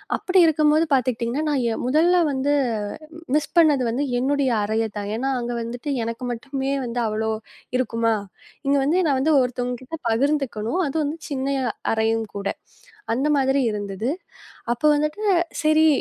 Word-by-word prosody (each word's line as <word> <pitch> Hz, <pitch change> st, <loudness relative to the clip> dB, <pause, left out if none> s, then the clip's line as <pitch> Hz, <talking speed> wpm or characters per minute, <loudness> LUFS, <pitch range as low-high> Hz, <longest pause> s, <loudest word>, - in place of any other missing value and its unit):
அப்படி 370 Hz, 0 st, +2 dB
இருக்கும்போது 310 Hz, 0 st, +3 dB
பாத்துக்கிட்டீங்கன்னா 250 Hz, +2 st, 0 dB
நான் 240 Hz, -6 st, 0 dB
முதல்ல 335 Hz, +6 st, +4 dB
வந்து 270 Hz, +2 st, 0 dB, 0.8 s
மிஸ் 300 Hz, -1 st, +1 dB
பண்ணது 295 Hz, -6 st, +5 dB
வந்து 255 Hz, +5 st, -1 dB, 0.2 s
என்னுடைய 275 Hz, 0 st, +1 dB
அறையைத்தான். 210 Hz, -1 st, -2 dB
ஏன்னா 265 Hz, +4 st, -1 dB
அங்க 240 Hz, 0 st, -3 dB
வந்துட்டு 245 Hz, +5 st, -4 dB
எனக்கு 230 Hz, +2 st, -5 dB
மட்டுமே 270 Hz, +3 st, -3 dB
வந்து 240 Hz, +1 st, -3 dB
அவ்ளோ 220 Hz, +1 st, -1 dB, 0.5 s
இருக்குமா? 230 Hz, -2 st, +1 dB, 0.5 s
இங்க 280 Hz, -, +3 dB
வந்து 310 Hz, +6 st, +2 dB
நான் 270 Hz, -2 st, +2 dB
வந்து 310 Hz, +4 st, +2 dB
ஒருத்தவங்ககிட்ட 250 Hz, +4 st, -3 dB
பகிர்ந்துக்கணும். 260 Hz, +1 st, 0 dB
அது 275 Hz, -, -5 dB
வந்து 295 Hz, +3 st, -3 dB
சின்ன 275 Hz, 0 st, -1 dB, 0.4 s
அறையும் 225 Hz, 0 st, +1 dB
கூட. 200 Hz, 0 st, -3 dB, 0.7 s
அந்த 270 Hz, +5 st, 0 dB
மாதிரி 270 Hz, +1 st, +2 dB
இருந்தது. 205 Hz, +3 st, -3 dB, 0.6 s
அப்ப 240 Hz, -, -13 dB
வந்துட்டு 305 Hz, +8 st, -1 dB, 0.4 s
சரி 310 Hz, +1 st, +5 dB
260 Hz, 135 wpm, -23 LUFS, 230-295 Hz, 0.8 s, பண்ணது